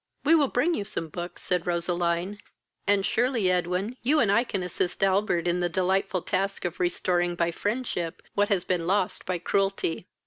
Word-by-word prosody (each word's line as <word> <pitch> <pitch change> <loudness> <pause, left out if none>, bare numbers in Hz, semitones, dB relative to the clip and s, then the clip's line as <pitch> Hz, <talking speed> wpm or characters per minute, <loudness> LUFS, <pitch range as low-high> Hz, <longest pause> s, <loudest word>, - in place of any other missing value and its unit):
"We 305 - +4
will 300 -4 +5
bring 270 +8 +1
you 210 - -1
some 165 -5 -5
books, 175 +3 -7
(said 180 -1 -1
Roseline,) 175 +2 -1 0.5
and 200 -1 +3
surely, 235 -5 +2
Edwin, 180 +6 -1
you 295 +6 +3
and 215 -5 +3
I 230 +4 +4
can 195 -6 -3
assist 180 +1 -2
Albert 190 -3 +2
in 175 +1 +1
the 175 0 +1
delightful 185 +1 0
task 195 0 -1
of 175 -1 -3
restoring 175 0 +1
by 170 0 +1
friendship 205 -4 -3
what 205 0 +2
has 195 -4 +2
been 175 -3 -1
lost 190 0 0
by 185 -1 0
cruelty." 195 -1 -1
185 Hz, 180 wpm, -27 LUFS, 175-205 Hz, 0.5 s, will